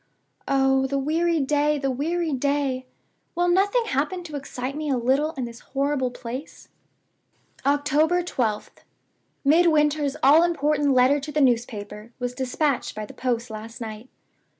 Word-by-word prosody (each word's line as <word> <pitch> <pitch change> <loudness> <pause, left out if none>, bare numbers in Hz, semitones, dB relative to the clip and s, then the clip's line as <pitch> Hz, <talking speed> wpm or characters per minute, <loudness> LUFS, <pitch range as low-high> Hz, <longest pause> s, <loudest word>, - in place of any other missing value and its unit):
Oh, 270 -1 +2
the 275 +1 -1
weary 325 +4 +1
day! 295 +2 +1
the 275 -1 -1
weary 320 +4 -1
day! 270 -1 -1 0.5
Will 350 +1 +1
nothing 405 +7 +2
happen 355 +1 -1
to 310 -4 -8
excite 270 -1 -5
me 305 0 -3
a 265 - +1
little 270 +6 +1
in 260 -5 -4
this 235 0 -9
horrible 275 -1 -1
place?" 245 +3 -8 1.0
"October 300 +5 +2
12th. 225 -11 -3 0.7
Midwinter's 300 -2 +3
all 290 +5 +7
important 295 -4 +1
letter 255 +3 +4
to 295 +2 -7
the 300 - 0
newspaper 230 -4 -1
was 245 -1 -3
dispatched 260 +1 -1
by 215 0 -4
the - - -12
post 240 -2 -2
last 220 +3 -8
night. 220 +1 -7
275 Hz, 145 wpm, -24 LUFS, 250-305 Hz, 1.0 s, all